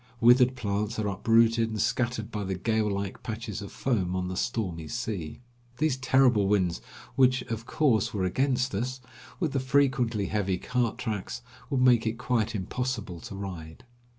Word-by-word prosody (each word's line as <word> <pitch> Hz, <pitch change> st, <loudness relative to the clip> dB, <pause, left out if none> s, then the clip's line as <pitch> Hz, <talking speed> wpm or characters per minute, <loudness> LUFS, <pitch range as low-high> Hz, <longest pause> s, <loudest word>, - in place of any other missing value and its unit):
Withered 125 Hz, +2 st, +6 dB
plants 105 Hz, -1 st, -2 dB
are 110 Hz, -1 st, -1 dB
uprooted 115 Hz, +3 st, +3 dB
and 110 Hz, -1 st, -4 dB
scattered 120 Hz, -2 st, -1 dB
by 105 Hz, -1 st, -3 dB
the 95 Hz, -1 st, -2 dB
gale 110 Hz, +2 st, +1 dB
like 100 Hz, -1 st, -3 dB
patches 110 Hz, -3 st, -5 dB
of 100 Hz, -, -8 dB
foam 95 Hz, -9 st, -1 dB
on 90 Hz, 0 st, -2 dB
the 95 Hz, -, -4 dB
stormy 90 Hz, -6 st, -2 dB
sea. 110 Hz, -7 st, -4 dB, 0.4 s
These 150 Hz, -2 st, +1 dB
terrible 130 Hz, -5 st, +3 dB
winds, 90 Hz, -9 st, +1 dB, 0.3 s
which 130 Hz, -1 st, +4 dB
of 115 Hz, 0 st, -5 dB
course 120 Hz, -10 st, +2 dB
were 100 Hz, -3 st, -2 dB
against 130 Hz, +5 st, +1 dB
us, 125 Hz, +6 st, -2 dB, 0.4 s
with 165 Hz, -6 st, 0 dB
the 135 Hz, -, 0 dB
frequently 130 Hz, -5 st, +2 dB
heavy 95 Hz, -3 st, 0 dB
cart 120 Hz, +2 st, -1 dB
tracks, 120 Hz, 0 st, -4 dB, 0.3 s
would 135 Hz, -4 st, +1 dB
make 120 Hz, -3 st, +5 dB
it 110 Hz, +1 st, -2 dB
quite 115 Hz, -2 st, 0 dB
impossible 105 Hz, -2 st, -3 dB
to 100 Hz, -, -8 dB
ride. 90 Hz, -5 st, -7 dB
115 Hz, 165 wpm, -28 LUFS, 100-125 Hz, 0.4 s, Withered